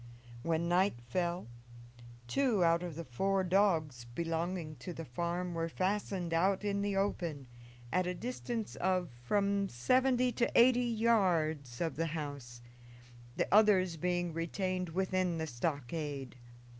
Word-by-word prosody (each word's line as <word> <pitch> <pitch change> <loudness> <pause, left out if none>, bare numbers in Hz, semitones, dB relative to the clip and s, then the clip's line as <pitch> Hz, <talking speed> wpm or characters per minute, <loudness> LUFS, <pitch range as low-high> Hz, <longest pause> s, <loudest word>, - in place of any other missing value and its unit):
When 165 +4 0
night 185 +1 +3
fell 175 +9 -2 0.8
two 235 - +2
out 170 0 +4
of 175 -4 -5
the 170 - -5
four 195 +10 0
dogs 170 -9 +2
belonging 165 -1 -2
to 180 - -7
the 165 0 -7
farm 170 +7 -2
were 165 0 -2
fastened 185 -1 -1
out 190 +4 +2
in 200 -1 0
the 200 -1 -1
open, 170 -8 -1 0.5
at 185 0 +2
a 180 - -2
distance 240 0 -4
of 185 -4 0
from 200 +7 +1
seventy 255 - +2
to 240 0 0
eighty 245 +1 +6
yards 175 - +1
of 165 -3 -1
the 165 +1 0
house, 140 -5 -6 0.7
the - - 0
others 195 -5 +5
being 175 +1 -1
retained 180 +2 -2
within 185 0 0
the 160 - -2
stockade. 140 0 -3
175 Hz, 135 wpm, -33 LUFS, 160-195 Hz, 0.8 s, eighty